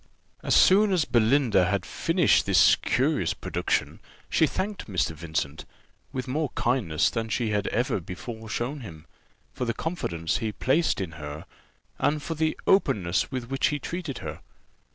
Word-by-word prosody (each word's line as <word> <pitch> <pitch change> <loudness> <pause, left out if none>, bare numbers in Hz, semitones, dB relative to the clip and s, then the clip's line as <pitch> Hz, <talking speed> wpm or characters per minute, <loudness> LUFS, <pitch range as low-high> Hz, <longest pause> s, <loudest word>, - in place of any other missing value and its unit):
As - - +1
soon 200 +2 +6
as 175 -6 +2
Belinda 120 -4 +3
had 95 -3 -1
finished - - +2
this - - +6
curious - - 0
production, - - -2 0.3
she 160 - +4
thanked 200 +5 -4
Mr. 90 -6 0
Vincent, 80 -2 -4 0.5
with 130 0 -4
more 145 +3 -1
kindness 110 - +1
than 115 -1 -3
she 110 0 -1
had 105 -1 0
ever 120 -3 0
before 110 +6 -8
shown 125 +7 -3
him, 80 - -10 0.5
for 125 - -3
the 115 -1 -2
confidence 85 - -2
he 110 -2 -2
placed 145 +10 +1
in 90 -4 -4
her, 75 +1 -7 0.5
and 150 0 +1
for 165 - -3
the 160 0 -1
openness 100 - +2
with 130 -2 -5
which 135 - +2
he 150 - -1
treated 160 -1 -5
her. - - -5
120 Hz, 155 wpm, -26 LUFS, 95-145 Hz, 0.5 s, soon